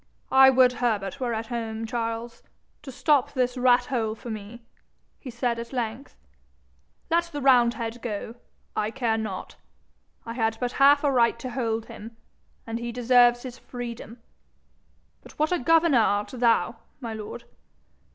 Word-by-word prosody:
'I 265 0 +8
would 255 -1 +5
Herbert 210 -3 -1
were 240 -3 -1
at 220 +1 -3
home, 225 -1 -4
Charles, 230 0 -4 0.4
to 270 - -9
stop 285 0 +1
this 250 -1 0
rat 250 -1 +3
hole 225 -4 -2
for 235 +1 -8
me,' 220 +2 -8 0.6
he 265 - -9
said 235 0 -2
at 235 0 -7
length. 245 +1 -5 0.9
'Let 340 +1 +3
the 300 -4 -7
roundhead 240 -3 +2
go 220 -1 -5 0.4
I 210 - 0
care 230 -2 -1
not. 205 -4 -6 0.7
I 230 - -5
had 225 -2 -1
but 245 -1 -2
half 285 +1 +6
a 285 - +3
right 235 -2 +3
to 250 +2 -6
hold 230 -3 -2
him, 225 +2 -11 0.5
and 230 0 -4
he 235 0 -4
deserves 240 0 +4
his 255 -1 -8
freedom. 235 -2 -8 1.0
But - - -16
what 305 +2 +1
a 360 - +1
governor 325 -1 +4
art 205 -2 +1
thou, 230 -4 +1 0.2
my 230 -4 -5
lord? 220 +2 -7
235 Hz, 155 wpm, -25 LUFS, 225-255 Hz, 1.0 s, I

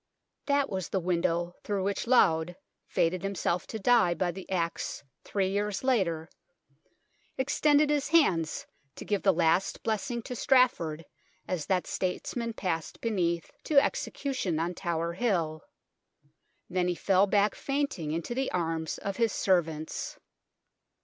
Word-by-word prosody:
That 280 -1 +2
was 190 - -4
the 190 - 0
window 175 -1 0
through 200 -2 -1
which 200 +3 -2
Laud, 175 -8 +4 0.3
fated 170 +2 +1
himself 190 -2 -1
to 220 - -5
die 220 -5 +4
by 175 +1 0
the 190 +2 -10
axe 170 -6 -2 0.2
three 195 -2 0
years 205 +1 -1
later, 180 -11 +1 1.1
extended 290 +2 +3
his 290 -1 +1
hands 190 - +2 0.3
to - - -8
give 205 -2 0
the 195 - +5
last 170 +2 +1
blessing 230 +2 -2
to 250 - -6
Straff 255 0 +4
ord 160 0 -5 0.4
as 170 -6 -3
that 185 -2 +1
statesman 230 +5 -3
passed 165 -7 -3
beneath 175 -7 -1
to 305 - -2
execu 280 0 +1
tion 175 -10 -1
on 170 +2 -1
Tower 170 -2 -2
Hill. 170 -7 0 1.1
Then 180 0 0
he 180 - 0
fell 195 +2 +3
back 205 +1 +3
fainting 275 - -2
into 165 +8 -3
the 265 +2 -1
arms 165 -2 -2
of 200 -1 -4
his 230 -2 +2
servants. 160 -6 -1
190 Hz, 145 wpm, -29 LUFS, 170-230 Hz, 1.1 s, the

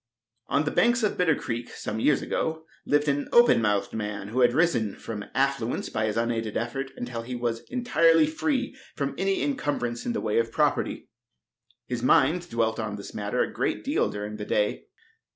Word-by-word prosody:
On - - +2
the 150 - -1
banks 240 0 +3
of 210 - +1
Bitter 165 -4 +3
Creek, 120 -2 -4
some 110 - -5
years 145 +4 +2
ago, 160 0 -2 0.2
lived 145 +1 +2
an 145 0 0
open 240 - +6
mouthed 105 -2 0
man, 105 -2 -4
who 120 +4 -2
had 120 -1 +6
risen 125 - +1
from 105 -3 -6
affluence 135 -3 0
by 110 - -1
his 105 - -2
unaided 115 -2 -1
effort 135 +4 -3
until 120 -1 -4
he 125 +2 -6
was 120 -1 -1
entirely 165 -11 +4
free 255 - -1 0.2
from 140 -1 -2
any 195 0 +1
incumbrance 140 - -2
in 240 - -2
the - - -1
way 110 +1 +1
of 115 0 -1
property. - - 0 0.8
His 125 -2 -3
mind 165 +6 +3
dwelt 115 -3 0
on 105 -2 -3
this 100 - -9
matter - - 0
a - - -5
great - - -1
deal - - +1
during 105 +1 -5
the 105 - -5
day. 105 0 0
125 Hz, 190 wpm, -26 LUFS, 110-160 Hz, 0.8 s, open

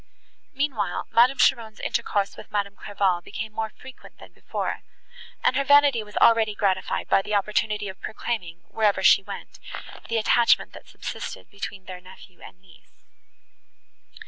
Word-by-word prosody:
Meanwhile, 275 -4 -1
Madame 250 +4 +5
Cheron's 230 -5 +2
intercourse 205 -4 -1
with - - -12
Madame 200 -1 -2
Clairval 195 -3 0
became 215 +4 -6
more 220 0 -2
frequent 260 +4 -14
than - - -14
before, - - -4 0.6
and 255 - +3
her 275 - +2
vanity 285 -3 +5
was 210 -1 -9
already 225 -2 +4
gratified 190 -2 0
by - - +4
the 210 +2 -2
opportunity 210 +1 0
of 190 0 -9
proclaiming, 185 -7 -4
wherever 205 -3 +1
she - - +7
went, - - -9 0.5
the 230 - 0
attachment 230 +2 +3
that - - -13
subsisted - - -7
between 200 -1 -7
their 180 -1 -8
nephew 185 0 -16
and 180 - -13
niece. 185 -2 -23
210 Hz, 145 wpm, -25 LUFS, 195-230 Hz, 0.6 s, she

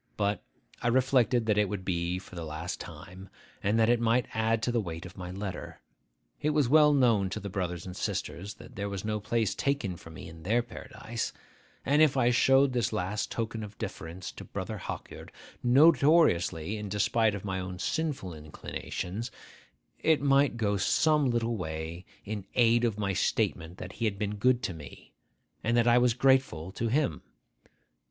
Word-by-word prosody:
But 100 -1 0 0.4
I - - 0
reflected 125 -1 +3
that 105 -1 +2
it 105 -2 +2
would 100 -3 -4
be 85 -1 -1
for 95 - -11
the 85 -2 -5
last 80 +3 -5
time, 95 +1 -10 0.3
and 105 +3 +1
that 110 - +5
it 120 0 +4
might 120 +2 +2
add 110 0 +1
to 120 - +1
the 120 -1 +1
weight 85 -2 -6
of 90 - -10
my 90 -1 -7
letter. 90 -4 -6 0.6
It 150 - +1
was 145 -4 +3
well 150 +2 +6
known 115 -9 +3
to - - -4
the 100 -1 -6
brothers 90 -3 -3
and 90 -1 -7
sisters 100 +1 -4
that - - -14
there 100 0 -3
was 100 0 -5
no 105 0 -1
place 110 0 0
taken 135 -10 -1
for 80 - -13
me 80 - -9
in 80 0 -11
their 115 +8 +1
paradise; - - -6 0.5
and 145 +3 +4
if 150 -3 +5
I 120 -1 +4
showed 135 +1 +4
this 120 -5 0
last 95 +4 -2
token 115 -1 -3
of 105 0 -9
deference 95 -4 -6
to - - -10
Brother - - -5
Hawkyard, - - -7 0.3
notoriously 130 - +4
in 105 -1 -5
despite 110 +2 +2
of 100 - -7
my 95 -1 -2
own 90 0 -5
sinful 135 - -2
inclinations, 90 - -5 0.7
it 160 -2 +3
might 140 -2 +3
go 105 -3 +1
some 150 - +3
little 120 -1 0
way 80 0 -5 0.2
in 105 -2 -5
aid 120 0 +4
of 110 -3 -1
my 100 -2 -1
statement 90 -3 0
that 90 - -7
he 115 - -2
had 100 -2 0
been 105 0 -2
good 125 +3 +2
to 90 - -2
me, 75 -5 -12 0.5
and 115 +1 +2
that 120 0 +3
I 120 +1 +6
was 120 -2 +3
grateful 130 - +2
to 115 +4 -2
him. 135 +4 0
105 Hz, 185 wpm, -29 LUFS, 95-120 Hz, 0.7 s, well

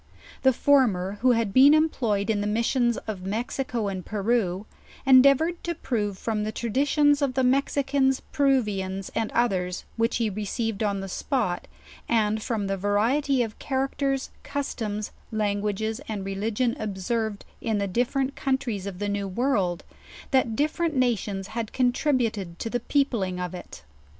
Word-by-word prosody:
The 265 - +5
former, 210 -8 +2
who 250 0 +5
had 225 -4 0
been 280 +3 +8
employ 250 -10 +1
ed 200 - 0
in 205 -2 0
the 205 - -1
missions 235 +2 +1
of 205 -4 -5
Mexico 230 +3 -2
and 190 -2 -4
Peru, 210 -2 0 0.4
endeavored 275 +6 +5
to 340 0 -2
prove 210 - -2
from 215 +1 -2
the 215 - -2
traditions 285 +6 +2
of 270 -3 0
the 260 - +2
Mexicans, 270 0 +2
Peruvians, 210 -10 0
and 225 -1 -1
others 185 -7 0
which 230 +1 +1
he 230 - +1
received 215 +1 -3
on 200 -2 0
the 195 - -5
spot, 190 -2 -2 0.4
and 220 -2 +2
from 215 -2 -2
the 195 0 -1
variety 240 +7 +2
of 220 -2 -7
char 265 0 0
acters, 275 -1 -1
customs, 225 -7 -3 0.2
languages 210 +2 -1
and 205 -3 -4
religion 215 +5 -1
observed 215 +1 -2 0.2
in 225 -3 0
the 200 - 0
dif 235 +6 0
ferent 275 0 0
countries 260 -9 -2
of 190 -2 -6
the 205 +2 -2
New 200 -1 -2
World, 195 -5 0 0.5
that 255 -5 +2
different 310 +4 0
nations 210 -6 0
had 225 -1 -4
contributed 245 - 0
to 225 - -4
the 245 - 0
peopling 230 -9 0
of 180 -1 -4
it. 175 - -9
225 Hz, 155 wpm, -26 LUFS, 200-265 Hz, 0.5 s, been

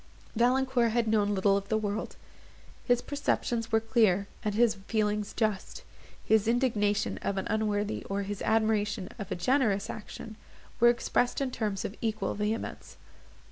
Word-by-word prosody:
Valancourt 245 0 +2
had 235 -1 +1
known 205 -2 +2
little 195 +1 +3
of 200 0 -3
the 220 - +2
world. 215 0 -3 0.7
His 245 -1 +2
perceptions 240 -5 -1
were 225 - +4
clear, 220 -4 +2 0.2
and 210 -2 -1
his 230 0 +4
feelings 210 -1 0
just; 215 -4 -2 0.4
his 220 -1 +3
indignation 215 -4 +1
of 200 - -2
an 190 - -2
unworthy, 210 -1 -1
or 200 0 -2
his 205 0 -5
admiration 215 -3 +1
of 200 - -6
a - - 0
generous 210 0 +1
action, 215 0 -9 0.4
were 240 - +7
expressed 245 +1 +1
in 270 -2 -1
terms 210 -5 -2
of - - -4
equal 220 -1 -1
vehemence. 210 +2 -4
215 Hz, 150 wpm, -29 LUFS, 205-235 Hz, 0.7 s, were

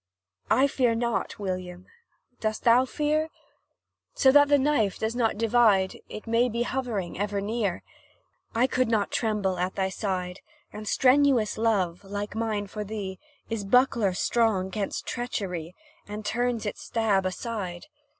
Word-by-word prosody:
I 265 - +5
fear 250 -4 +1
not, 235 0 -1
William; 185 -2 -5 0.5
dost 215 -1 -2
thou 245 +2 +5
fear? 305 +3 0 0.9
So 265 - +5
that 290 +1 +6
the 285 0 +5
knife 260 -8 +1
does 220 +2 -2
not 230 -4 +1
divide, 215 -4 +3
It 215 - -8
may 230 +2 +2
be 235 +1 -2
ever - - -4
hovering 230 -9 -2 0.3
near: 210 -4 -1 0.7
I 235 +2 +4
could 255 -1 +1
not 220 -3 0
tremble 205 -5 0
at 180 +1 -1
thy 190 -1 0
side, 185 -2 -3 0.3
And 210 0 -7
strenuous 260 -2 +3
love 205 -6 0
like 205 +1 -5
mine 220 -2 -1
for 210 +2 -5
thee 200 -2 -5 0.3
Is 225 -3 -3
buckler 230 -2 +3
strong 200 -1 +1
'gainst 205 -1 -3
treachery, 180 -8 -4 0.3
And 210 +1 -7
turns 240 +1 -1
its 205 - -4
stab 205 -5 +1
aside. 185 -3 -5
215 Hz, 145 wpm, -27 LUFS, 195-240 Hz, 0.9 s, that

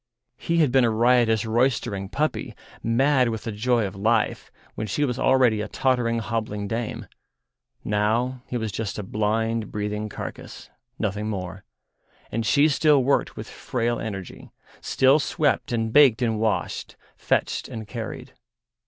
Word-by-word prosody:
He 170 - -1
had 155 -6 +3
been 130 0 +4
a 120 - +3
riotous, 115 -1 +3
roystering 110 -4 0
puppy, 155 +7 -2 0.3
mad 130 +2 +3
with 110 -1 -4
the 115 - -4
joy 115 +2 +1
of 95 0 -6
life, 110 +2 0 0.2
when 110 - -4
she 145 +10 0
was 125 -1 -3
already 125 -5 +3
a - - -3
tottering, 120 -3 +1
hobbling 110 -2 -3
dame; 115 +1 -4 0.8
now 115 +5 0
he 125 - -3
was 110 -2 -3
just 105 0 -4
a 105 - -4
blind, 110 +2 -1
breathing 105 +1 -3
carcase, - - -8 0.3
nothing 105 0 -2
more, 95 -2 -5 0.7
and 115 0 -2
she 145 +4 +5
still 150 -2 +3
worked 140 +2 +1
with - - -7
frail 120 -1 -2
energy, 95 -4 -7 0.3
still 135 +3 +4
swept 150 -3 0
and 115 -1 -1
baked 130 -5 +6
and 110 -2 0
washed, 110 -1 -2 0.2
fetched - - -1
and 110 -1 -7
carried. 115 -1 -7
115 Hz, 150 wpm, -24 LUFS, 105-125 Hz, 0.8 s, baked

